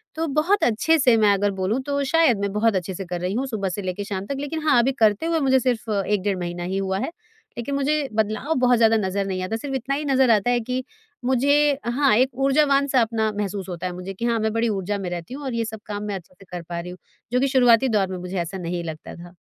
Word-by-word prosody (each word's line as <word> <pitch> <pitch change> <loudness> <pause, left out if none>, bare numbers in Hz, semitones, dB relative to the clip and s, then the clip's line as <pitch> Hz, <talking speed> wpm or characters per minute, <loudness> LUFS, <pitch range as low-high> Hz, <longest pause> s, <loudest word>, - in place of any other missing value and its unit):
तो 325 +1 -1
बहुत 315 +8 +1
अच्छे 245 +8 +3
से 250 -3 +5
मैं 210 -2 +4
अगर 200 +1 +1
बोलूँ, 190 +5 -1
तो 280 +1 -2
शायद 275 -5 +3
मैं 200 0 -1
बहुत 215 0 +2
अच्छे 185 0 -2
से 190 +1 -6
कर 175 0 -5
रही 180 +2 -2
हूँ, 255 +5 -1
सुबह 210 -6 -2
से 200 +3 -4
लेके 185 +2 -4
शाम 195 -1 -4
तक। 280 - -4
लेकिन 300 +3 -4
हाँ, 265 -5 +5
अभी 245 +3 +3
करते 215 +5 +3
हुए 330 -1 +1
मुझे 265 -2 +3
सिर्फ 245 -3 -1 0.2
1 210 -2 0
डेढ़ 200 -2 0
महीना 175 0 -4
ही 185 +2 -2
हुआ 190 -1 -1
है, - - -2 0.5
लेकिन 240 +4 -3
मुझे 285 +1 0
बदलाव 215 +7 0
बहुत 250 -1 +4
ज़्यादा 225 -1 +4
नज़र 200 -1 -1
नहीं 190 -1 -3
आता। 220 +5 -2
सिर्फ 270 +3 -5
इतना 265 +2 -2
ही 295 +1 -3
नज़र 265 -3 +3
आता 215 +2 +3
है 245 - +2
कि 255 +2 -3 0.4
मुझे, 285 +3 +3
हाँ, 255 +1 +2
एक 255 +4 +3
ऊर्जावान-सा 275 -1 +3
अपना 220 -1 0
महसूस 200 -2 -3
होता 180 0 -4
है 180 - -5
मुझे 180 +2 -6
कि 230 +5 -4
हाँ, 235 -1 +1
मैं 220 0 -1
बड़ी 230 0 +1
ऊर्जा 200 0 -2
में 190 -3 -4
रहती 175 +5 -6
हूँ 285 +2 -7
और 260 - -3
ये 230 0 -1
सब 220 0 -7
काम 205 -1 -5
मैं 205 -1 -3
अच्छे 185 -1 -10
से 195 - -15
कर 180 -1 -5
पा 170 -1 -3
रही 175 +1 -6
हूँ, 180 - -10 0.4
जो 250 - +3
कि 275 - +2
शुरुआती 255 -1 +4
दौर 205 -4 +2
में 185 - -4
मुझे 180 +1 -5
ऐसा 170 +3 -5
नहीं 175 -1 -4
लगता 160 -2 -7
था। 175 +1 -12
220 Hz, 270 wpm, -23 LUFS, 190-265 Hz, 0.5 s, से